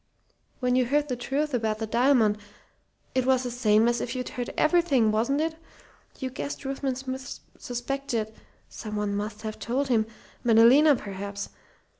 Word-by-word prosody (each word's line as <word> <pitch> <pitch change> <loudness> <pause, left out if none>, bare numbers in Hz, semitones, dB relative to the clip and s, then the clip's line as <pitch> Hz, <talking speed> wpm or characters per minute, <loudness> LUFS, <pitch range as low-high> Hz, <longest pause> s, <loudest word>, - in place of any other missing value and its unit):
"When 250 0 +2
you 255 -1 +3
heard 290 +3 +1
the 250 - 0
truth 275 +4 -2
about 220 -3 0
the 220 - -3
diamond, 230 -2 +3 0.7
it 255 - +2
was 260 0 +3
the 245 - -3
same 225 -2 +3
as 240 -1 +1
if 245 - -3
you'd 250 -1 -3
heard 245 -1 -4
everything, 310 -10 +3
wasn't 235 +7 +1
it? 320 0 -1 0.6
You 260 -2 -4
guessed 280 +2 -5
Ruthven 270 -1 -2
Smith 260 0 -6 0.2
suspected 240 -3 -3 0.3
someone 210 -2 -3
must 210 +1 -4
have 215 -1 -5
told 265 +4 -1
him 220 -3 +2 0.4
Madalena 245 +6 +6
perhaps. 200 -2 -6
245 Hz, 155 wpm, -27 LUFS, 220-270 Hz, 0.7 s, Madalena